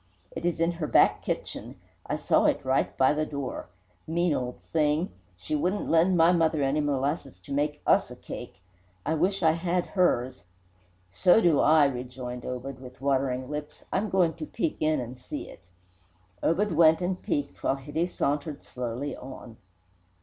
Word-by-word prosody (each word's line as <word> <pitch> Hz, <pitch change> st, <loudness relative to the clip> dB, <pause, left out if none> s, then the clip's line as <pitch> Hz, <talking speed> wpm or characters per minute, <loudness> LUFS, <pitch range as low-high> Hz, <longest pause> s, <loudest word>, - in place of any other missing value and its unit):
It -, -, -6 dB
is 175 Hz, -, -1 dB
in 165 Hz, +1 st, +2 dB
her 165 Hz, -3 st, -4 dB
back -, -, +4 dB
kitchen. -, -, -4 dB, 0.3 s
I -, -, -1 dB
saw -, -, +2 dB
it -, -, +1 dB
right 130 Hz, +1 st, +1 dB
by 130 Hz, +2 st, +4 dB
the 155 Hz, +1 st, 0 dB
door. 140 Hz, -4 st, -5 dB, 0.4 s
Mean 170 Hz, 0 st, +1 dB
old 125 Hz, -2 st, -3 dB
thing! 155 Hz, +2 st, +2 dB, 0.3 s
She 90 Hz, -, -6 dB
wouldn't 180 Hz, +7 st, -1 dB
lend 170 Hz, +3 st, +4 dB
my 165 Hz, +1 st, +6 dB
mother 160 Hz, -4 st, +2 dB
any 135 Hz, +2 st, +1 dB
molasses 145 Hz, -, -1 dB
to 115 Hz, -, -7 dB
make 150 Hz, +1 st, -1 dB
us -, -, +4 dB
a -, -, -9 dB
cake. 90 Hz, -, -9 dB, 0.4 s
I 160 Hz, -, +1 dB
wish 185 Hz, +4 st, 0 dB
I 160 Hz, -, +6 dB
had 175 Hz, +2 st, 0 dB
hers!" 130 Hz, -10 st, +1 dB, 0.7 s
"So 175 Hz, -, +5 dB
do 170 Hz, -9 st, +4 dB
I!" 155 Hz, -1 st, +6 dB
rejoined 125 Hz, -2 st, -4 dB
Obed, 125 Hz, +1 st, -5 dB
with 125 Hz, -1 st, -11 dB
watering 130 Hz, -2 st, 0 dB
lips. 150 Hz, +1 st, -6 dB
"I'm 205 Hz, +3 st, 0 dB
going 180 Hz, -4 st, +3 dB
to 160 Hz, -, -5 dB
peek 165 Hz, -, -2 dB
in 155 Hz, -1 st, +2 dB
and 125 Hz, 0 st, -5 dB
see 125 Hz, -, -7 dB
it." -, -, -12 dB, 0.8 s
Obed 200 Hz, +5 st, +1 dB
went 160 Hz, 0 st, +5 dB
and 180 Hz, 0 st, -2 dB
"peeked," 145 Hz, -1 st, -3 dB
while -, -, +1 dB
Hitty 145 Hz, +5 st, -2 dB
sauntered 145 Hz, -3 st, -2 dB
slowly 125 Hz, +3 st, -4 dB
on. 125 Hz, -3 st, -10 dB
150 Hz, 170 wpm, -27 LUFS, 130-165 Hz, 0.8 s, my